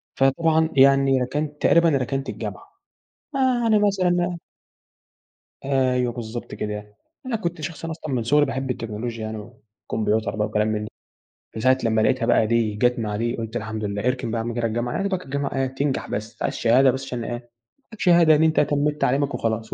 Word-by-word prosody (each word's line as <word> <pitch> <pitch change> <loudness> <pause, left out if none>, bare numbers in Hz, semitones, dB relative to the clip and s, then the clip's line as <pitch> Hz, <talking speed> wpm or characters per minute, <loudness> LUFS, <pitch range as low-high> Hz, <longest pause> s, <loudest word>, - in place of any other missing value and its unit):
فطبعًا 160 +4 +2
يعني 135 -1 +5
ركنت 150 +4 -3
تقريبًا 170 0 +5
ركنت 135 -1 -1
الجامعة - - -6 0.7
آآ، - - 0 0.2
يعني 220 -2 +4
مثلًا 180 -3 +1 1.3
أيوه 130 -3 +1
بالضبط 115 -2 -6
كده، 105 0 -5 0.3
أنا 255 -3 -2
كنت 175 -6 -3
شخص 165 +2 -6
أصلًا 160 -3 -5
من 120 -3 0
صغري 145 +5 +4
باحب 135 0 -3
التكنولوجيا 115 -1 -5
يعني 110 0 -5 0.5
والكمبيوتر 110 0 0
بقى 105 0 0
وكلام 105 0 0
من 105 -1 -1
ده، - - -8 0.7
من 110 - -4
ساعة 130 +1 +4
لمّا 110 -1 +2
لاقيتها 125 +2 +2
بقى 110 - +3
دي 115 -2 +1
جت 120 +3 +2
مع 105 -2 -2
دي 120 +3 -1
قلت 115 0 -6
الحمد 110 -1 -4
لله، 100 0 -3
اركن 125 -3 -1
بقى 115 - -1
يا - - -5
عم 120 - -3
كده 115 0 0
الجامعة، 120 +2 -2
يا - - -1
دوبك 190 -2 -2
الجامعة 140 +1 -3
إيه 135 0 +1
تنجح 135 +1 -2
بس 110 +2 -4
أنت - - -9
عايز - - 0
شهادة 125 +3 +4
بس 130 +1 -5
عشان 125 -3 -4
إيه - - -5
يبقى 120 0 -7 0.4
معاك 220 - -12
شهادة 170 -3 +5
إن 155 - +3
أنت 160 0 +3
تميت 150 +1 +1
تعليمك 140 +2 +1
وخلاص 115 -1 -2
130 Hz, 195 wpm, -23 LUFS, 115-150 Hz, 1.3 s, يعني